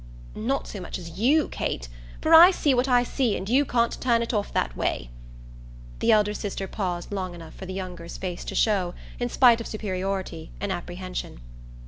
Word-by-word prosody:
"Not 265 +6 -1
so 205 - -7
much 180 - -5
as 170 0 -9
you, 285 +7 +4
Kate; 60 - -3 0.3
for 320 - +2
I 335 +3 +11
see 300 -7 +2
what 250 +1 +2
I 245 -2 +4
see 245 -3 0
and 190 - -6
you 265 +6 +3
can't 235 -2 0
turn 235 -2 +3
it 230 - -4
off 205 -2 -1
that 60 -2 -1
way." - - -2 0.9
The - - +3
elder 210 -1 +4
sister 200 -2 -4
paused 180 -3 -3
long 185 -3 -3
enough 165 -2 -11
for 190 - -9
the 185 - -5
younger's 180 -3 -6
face 180 -2 -5
to - - -5
show, 190 -5 +1 0.2
in 245 0 -1
spite 240 -2 +5
of - - -6
superiority, 190 -5 -4
an 200 -1 -2
apprehension. 180 - -5
200 Hz, 190 wpm, -25 LUFS, 180-240 Hz, 0.9 s, I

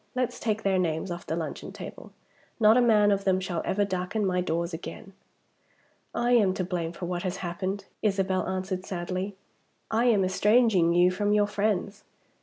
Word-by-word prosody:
Let's 250 -1 -1
take 220 -1 -1
their 190 -1 +2
names 165 +1 -1
off 175 0 -6
the 160 - -1
luncheon 165 -2 -5
table. - - -9 0.5
Not 220 0 +6
a 250 - +5
man 210 -3 +4
of 200 0 +1
them 190 -1 +2
shall 180 -3 -3
ever 205 +1 +1
darken 190 +2 -2
my 180 -1 +1
doors 170 0 -2
again!" 190 +3 -8 1.0
"I 240 +1 0
am 205 -6 +4
to 185 - -1
blame 175 -2 -3
for 175 +1 -6
what 175 0 -3
has 185 0 -3
happened," 190 +3 -3 0.2
Isabel 195 -3 0
answered 185 0 -3
sadly. 185 +2 -4 0.6
"I 225 +2 +2
am 210 -6 +4
estranging 210 -2 +3
you 175 +1 +5
from 205 +2 0
your 210 0 +4
friends. 205 0 -1
190 Hz, 180 wpm, -27 LUFS, 180-210 Hz, 1.0 s, Not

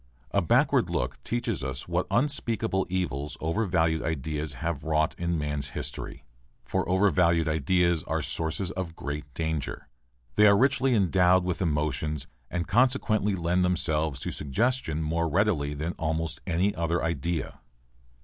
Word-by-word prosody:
A - - +2
backward - - +3
look - - -2
teaches 120 - -2
us 65 0 -4
what 90 +1 0
unspeakable 115 -7 0
evils 75 -6 -2
overvalued 80 -2 +1
ideas 75 0 -2
have 80 +2 -3
wrought 80 -1 +1
in 85 0 0
man's 75 -2 -2
history. 70 - -5 0.4
For - - -1
overvalued 85 -4 +3
ideas 85 +2 +2
are - - -1
sources 85 +3 -2
of 90 -3 -5
great 75 -1 -5
danger. 80 -6 -3 0.5
They 105 0 +7
are 100 -1 +6
richly 135 0 +3
endowed 95 -2 +4
with 90 +1 -2
emotions 75 -2 -1 0.2
and 90 -1 -2
consequently 110 -4 +2
lend 90 +1 +1
themselves 80 -5 +1
to - - -3
suggestion 80 - 0
more 85 +2 0
readily 80 -5 +1
than 80 +4 -3
almost 80 0 -2
any 90 +4 +1
other 85 +1 -1
idea. 85 +1 -2
85 Hz, 140 wpm, -27 LUFS, 75-95 Hz, 0.5 s, They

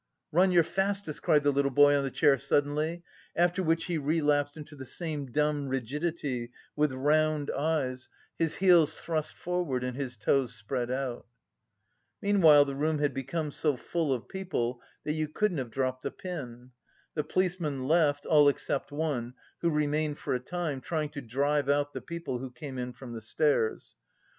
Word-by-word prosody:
"Run 185 +4 +4
your 175 -2 +5
fastest!" 195 -2 -2
cried 150 -4 +3
the 145 - +4
little 140 0 +2
boy 145 +2 +6
on 140 - +1
the 135 - -1
chair 135 +1 +3
suddenly, 150 +5 0 0.3
after 175 +2 +2
which 165 -1 +1
he 170 -3 -1
relapsed 145 0 +1
into 150 0 -10
the 135 - -8
same 150 0 -4
dumb 150 0 +1
rigidity, 135 -1 -2 0.3
with 150 -1 +2
round 150 +2 +1
eyes, 140 -4 -1 0.3
his 165 -2 +1
heels 175 -5 +5
thrust 160 -2 -2
forward 175 -8 -2
and 125 -1 -3
his 130 -3 -4
toes 125 +2 +1
spread 120 +3 -3
out. 130 -1 -3 0.9
Meanwhile 165 -9 +6
the 140 - -4
room 155 +3 0
had 145 -1 0
become 145 +3 -3
so 150 0 +1
full 165 +2 -1
of 125 -3 -2
people 130 -11 -3 0.2
that 150 - -1
you 155 0 -1
couldn't 180 +1 0
have 125 -3 -4
dropped 130 +1 -2
a - - -1
pin. 130 -9 -7 0.4
The 150 - -1
policemen 155 -6 -1
left, 150 -3 +3
all 150 -2 +6
except 140 0 -2
one, 140 -5 -2 0.2
who 170 - +1
remained 150 -1 0
for - - -3
a 125 - 0
time, 155 0 -3
trying 155 -1 -2
to 145 -1 -7
drive 140 +4 0
out 145 0 +1
the - - -5
people 170 -7 -5
who 130 +1 -5
came 130 0 -7
in 125 0 -3
from 125 -2 -9
the 115 - -6
stairs. 115 0 0
145 Hz, 175 wpm, -29 LUFS, 135-160 Hz, 0.9 s, boy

